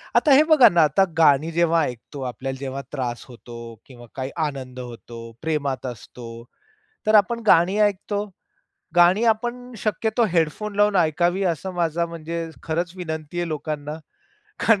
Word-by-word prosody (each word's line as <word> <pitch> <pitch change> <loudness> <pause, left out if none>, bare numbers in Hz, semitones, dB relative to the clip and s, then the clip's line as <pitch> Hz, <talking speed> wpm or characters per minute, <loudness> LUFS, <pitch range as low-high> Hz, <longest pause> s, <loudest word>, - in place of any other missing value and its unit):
आता 290 - +5
हे 290 - +7
बघा 265 -8 +8
ना, 170 -3 +4
आता 150 +6 +3
गाणी 155 0 +4
जेव्हा 165 0 +2
ऐकतो 125 +3 -6
आपल्याला 130 +1 -4
जेव्हा 135 0 -4
त्रास 125 -4 -4
होतो 120 -2 -10
किंवा 120 -3 -14
काही 130 0 -4
आनंद 130 -3 -6
होतो, 115 -1 -9
प्रेमात 145 -5 -2
असतो, 115 -1 -9 0.6
तर 215 - +3
आपण 215 +3 +4
गाणी 180 +4 +4
ऐकतो. 205 0 0 0.7
गाणी 180 +6 +5
आपण 240 +3 -1
शक्यतो 220 +3 0
हेडफोन 175 +6 0
लावून 205 -1 +3
ऐकावी 175 +3 +2
असं 180 +2 -2
माझा 170 -1 0
म्हणजे 165 0 -5 0.2
खरंच 170 +2 -2
विनंती 160 -2 -5
आहे 175 - -2
लोकांना. 150 0 -4 0.6
कारण 225 -3 +4
165 Hz, 145 wpm, -23 LUFS, 135-195 Hz, 0.7 s, बघा